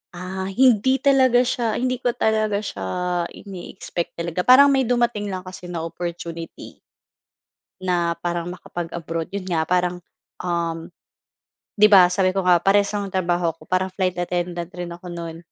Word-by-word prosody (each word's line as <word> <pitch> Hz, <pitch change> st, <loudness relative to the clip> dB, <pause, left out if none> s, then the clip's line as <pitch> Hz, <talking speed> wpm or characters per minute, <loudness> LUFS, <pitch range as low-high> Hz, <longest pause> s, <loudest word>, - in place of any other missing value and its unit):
Ah, 190 Hz, +1 st, -5 dB
hindi 255 Hz, +4 st, +3 dB
talaga 260 Hz, -3 st, +5 dB
siya 235 Hz, -3 st, -1 dB
hindi 255 Hz, 0 st, -1 dB
ko 245 Hz, -1 st, -1 dB
talaga 215 Hz, -1 st, +1 dB
siya 100 Hz, -, -5 dB, 0.4 s
ine-expect 185 Hz, -2 st, -7 dB
talaga. 170 Hz, +1 st, -4 dB
Parang 275 Hz, +3 st, +8 dB
may 265 Hz, -3 st, +2 dB
dumating 240 Hz, -4 st, +1 dB
lang 185 Hz, -2 st, -4 dB
kasi 185 Hz, -1 st, -10 dB
na 170 Hz, -2 st, -4 dB
opportunity. 170 Hz, 0 st, -7 dB, 1.0 s
Na 175 Hz, -2 st, 0 dB
parang 175 Hz, 0 st, -3 dB
makapag-abroad 165 Hz, -1 st, -5 dB
yun 195 Hz, -2 st, -5 dB
nga 165 Hz, -3 st, +1 dB
parang, 180 Hz, +1 st, 0 dB, 0.4 s
um, 170 Hz, -1 st, -2 dB, 0.9 s
'di 210 Hz, -, +8 dB
ba 185 Hz, -4 st, +7 dB
sabi 185 Hz, -1 st, +1 dB
ko 195 Hz, -, +1 dB
nga 180 Hz, -1 st, +5 dB
parehas 200 Hz, +2 st, +3 dB
ang 205 Hz, -1 st, -2 dB
trabaho 175 Hz, -3 st, 0 dB
ko, -, -, -18 dB
parang 185 Hz, 0 st, -1 dB
flight 185 Hz, -2 st, -1 dB
attendant 175 Hz, -1 st, -2 dB
rin 175 Hz, -1 st, -5 dB
ako 175 Hz, +1 st, -9 dB
no'n, 170 Hz, -2 st, -6 dB
180 Hz, 150 wpm, -22 LUFS, 170-205 Hz, 1.0 s, Parang